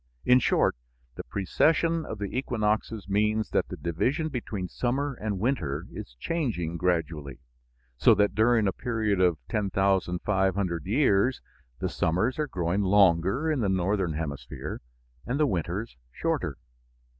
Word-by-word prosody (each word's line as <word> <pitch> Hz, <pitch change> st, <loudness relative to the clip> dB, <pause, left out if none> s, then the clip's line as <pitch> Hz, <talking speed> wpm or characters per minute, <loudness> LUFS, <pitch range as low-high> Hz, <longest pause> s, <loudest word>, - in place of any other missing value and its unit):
In 125 Hz, 0 st, +6 dB
short, -, -, +2 dB, 0.4 s
the -, -, -7 dB
precession 165 Hz, -, +1 dB
of 110 Hz, -, -5 dB
the 100 Hz, +1 st, -5 dB
equinoxes 110 Hz, -4 st, -1 dB
means 105 Hz, +2 st, +1 dB
that -, -, +1 dB
the -, -, -7 dB
division 130 Hz, -, -1 dB
between 105 Hz, -8 st, -4 dB
summer 135 Hz, +8 st, -1 dB
and 105 Hz, -4 st, -3 dB
winter 90 Hz, -, -1 dB
is -, -, -9 dB
changing 110 Hz, -, -2 dB
gradually, 80 Hz, -6 st, -1 dB, 0.6 s
so 110 Hz, -, +6 dB
that 105 Hz, -2 st, +2 dB
during 110 Hz, 0 st, +3 dB
a 95 Hz, -, 0 dB
period 110 Hz, -5 st, -1 dB
of 90 Hz, -3 st, +3 dB
10,500 95 Hz, -3 st, 0 dB
years 120 Hz, 0 st, +3 dB, 0.4 s
the -, -, -2 dB
summers 100 Hz, -, 0 dB
are 150 Hz, -, 0 dB
growing 90 Hz, -3 st, -1 dB
longer 100 Hz, -, +3 dB
in 150 Hz, -, 0 dB
the 105 Hz, -5 st, +1 dB
northern 95 Hz, -1 st, 0 dB
hemisphere 75 Hz, -2 st, -5 dB, 0.5 s
and 130 Hz, +4 st, -1 dB
the 155 Hz, -, +4 dB
winters 95 Hz, -, -3 dB
shorter. -, -, -2 dB
100 Hz, 135 wpm, -27 LUFS, 90-120 Hz, 0.6 s, In